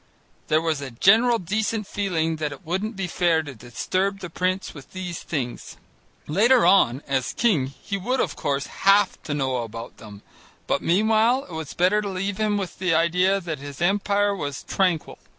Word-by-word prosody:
There 155 +1 +2
was 160 -3 -1
a 135 - -5
general 225 - +4
decent 210 +3 -2
feeling 165 -6 -1
that 150 -1 -2
it 170 +5 -11
wouldn't 195 +7 -2
be 195 -1 -2
fair 170 -2 +1
to 145 -3 -8
disturb 185 - -2
the 180 -3 -7
prince 185 +2 -1
with 145 -3 -13
these 180 -2 -5
things: 135 -8 -5 0.5
later 235 - +4
on, 140 -9 +4
as 135 -2 -1
king, 185 - +2
he 140 +9 -6
would, 250 +7 -1
of - - 0
course, 140 0 -1
have 200 0 +2
to 145 - -4
know 130 -3 0
all 120 - -2
about 115 +2 -9
them, 105 -2 -12 0.4
but - - 0
meanwhile 220 +7 +3
it - - -15
was 160 -3 -6
better 185 +4 +3
to 205 - -4
leave 195 +1 -3
him 215 -1 +1
with 190 -5 -5
the 180 -3 +1
idea 180 +4 +3
that 165 -6 -5
his 140 -1 -9
empire 200 +2 +1
was 145 -6 -5
tranquil. 180 -5 -1
180 Hz, 185 wpm, -24 LUFS, 145-200 Hz, 0.5 s, general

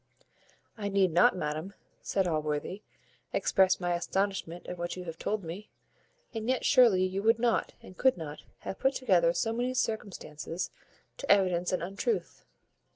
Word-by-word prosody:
"I 205 -1 -2
need 195 -2 +3
not, 175 +3 +5
madam," 155 +4 -3 0.3
said 190 -2 0
Allworthy, 155 +4 -2 0.5
"express 190 -2 +3
my 175 -1 0
astonishment 175 0 -2
at 180 - -5
what 175 0 -3
you 180 - -6
have 165 -2 -7
told 215 -1 -2
me; 175 +6 -7 0.6
and 225 +1 -3
yet 260 - +1
surely 235 -9 +6
you 190 +1 -2
would 225 +2 +4
not, 235 -1 +1
and 185 - -12
could 260 +1 +3
not, 155 -3 -7 0.2
have - - -6
put 265 0 +2
together 180 -9 +3
so 225 +6 -1
many 245 +2 -1
circumstances 185 -8 -3 0.5
to 280 - -1
evidence 180 -3 +3
an 185 - -1
untruth. 195 - -2
190 Hz, 155 wpm, -30 LUFS, 175-220 Hz, 0.6 s, surely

